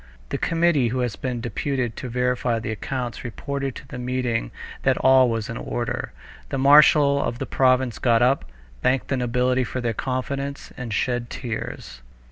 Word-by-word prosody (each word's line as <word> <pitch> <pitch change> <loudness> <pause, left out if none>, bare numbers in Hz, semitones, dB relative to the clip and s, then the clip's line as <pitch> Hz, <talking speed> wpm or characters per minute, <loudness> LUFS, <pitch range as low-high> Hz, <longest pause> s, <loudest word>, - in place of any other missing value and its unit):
The - - -2
committee 165 -6 +2
who 125 +2 -1
had 120 -5 -1
been 125 -3 -2
deputed 120 +1 -2
to 125 - -5
verify 125 -1 0
the 110 0 -4
accounts 120 +1 -4
reported 135 +3 -4
to - - -10
the 125 - -7
meeting 125 -2 -1 0.3
that - - +2
all 130 -1 +5
was 115 -2 -2
in 115 - -5
order. 120 -1 -3 0.4
The - - -2
marshal 140 +1 +6
of 120 - -2
the - - -3
province 130 -2 +2
got 120 -1 +3
up, 130 +3 +2 0.4
thanked 130 0 +1
the 135 - +1
nobility 125 +1 +1
for 130 - -4
their 120 -2 -1
confidence, 140 +4 -4
and 125 -3 -6
shed 120 +2 -1
tears. 110 - -6
125 Hz, 170 wpm, -23 LUFS, 120-135 Hz, 0.4 s, marshal